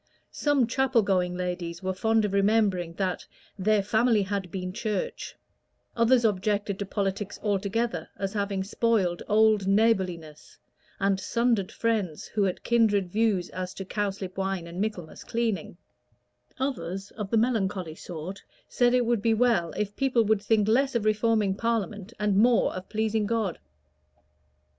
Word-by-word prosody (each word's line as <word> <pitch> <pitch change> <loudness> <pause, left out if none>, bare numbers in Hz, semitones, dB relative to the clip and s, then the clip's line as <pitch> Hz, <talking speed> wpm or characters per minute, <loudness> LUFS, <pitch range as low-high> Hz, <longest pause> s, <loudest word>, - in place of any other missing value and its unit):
Some 290 -4 +2
chapel 260 -1 +2
going 180 -2 +1
ladies 180 -1 -4
were 190 0 -1
fond 220 +3 +2
of 200 - -3
remembering 200 -4 +2
that 185 -1 -2 0.4
"their 210 +1 +2
family 220 +1 +2
had 195 -1 -3
been 185 0 -5
Church"; 215 -3 -3 0.6
others 235 +1 +4
objected 205 -1 0
to 200 - -3
politics 200 0 -2
altogether 210 +3 -1
as 195 0 -3
having 200 -2 -1
spoiled 195 -4 0
old 215 -2 +3
neighborliness, 190 -7 0 0.4
and 195 -1 +1
sundered 230 -2 0
friends 210 -9 -1
who 215 - -2
had 185 - -3
kindred 205 -6 +2
views 210 -4 +1
as 185 0 -5
to 195 - -6
cowslip 195 -2 -3
wine 190 -2 -2
and 170 +2 -5
Michaelmas 205 -7 -4
cleaning; 225 -8 -2 0.8
others, 195 -8 -3
of 210 -3 -6
the 230 - +2
melancholy 200 -7 0
sort, 175 +4 -7 0.3
said 245 0 +2
it 250 -1 +2
would 235 -2 +1
be 225 +1 +2
well 225 -8 +2
if 205 -1 -3
people 260 -4 +2
would 215 -1 +2
think 210 0 +2
less 265 +4 +2
of 225 -2 0
reforming 215 -2 +2
Parliament 210 -2 -2
and 210 -2 +1
more 235 +2 +4
of 185 0 -7
pleasing 220 -1 0
God. 220 -5 -1
205 Hz, 150 wpm, -27 LUFS, 190-225 Hz, 0.8 s, others